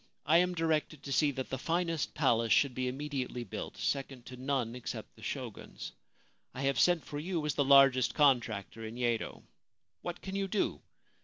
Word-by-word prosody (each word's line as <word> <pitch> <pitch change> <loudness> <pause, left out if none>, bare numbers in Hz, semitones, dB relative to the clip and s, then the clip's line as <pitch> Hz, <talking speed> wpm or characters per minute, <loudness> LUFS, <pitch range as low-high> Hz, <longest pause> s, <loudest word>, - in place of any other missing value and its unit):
1 160 +3 +5
am 180 0 +1
directed 155 -3 0
to 140 - -6
see 150 +2 +4
that 130 -2 -4
the 130 - -2
finest 165 0 -1
palace 115 -6 +2
should 140 -3 +4
be 130 0 -2
immediately 130 -2 -3
built, 105 - -6
second 135 -3 -2
to 125 - -9
none 130 -2 -1
except 125 - -6
the - - -17
Shogun's. - - -6 0.6
I 130 - -4
have 135 0 +1
sent 175 -3 +4
for 145 - -5
you 165 -1 -2
as 150 - 0
the 145 - +2
largest 135 -4 +6
contractor 120 -6 +2
in 110 +2 -6
Yedo. 120 -2 -1 0.6
What 175 0 -5
can 190 0 -5
you 195 0 0
do 200 +1 -1
140 Hz, 180 wpm, -32 LUFS, 125-155 Hz, 0.6 s, largest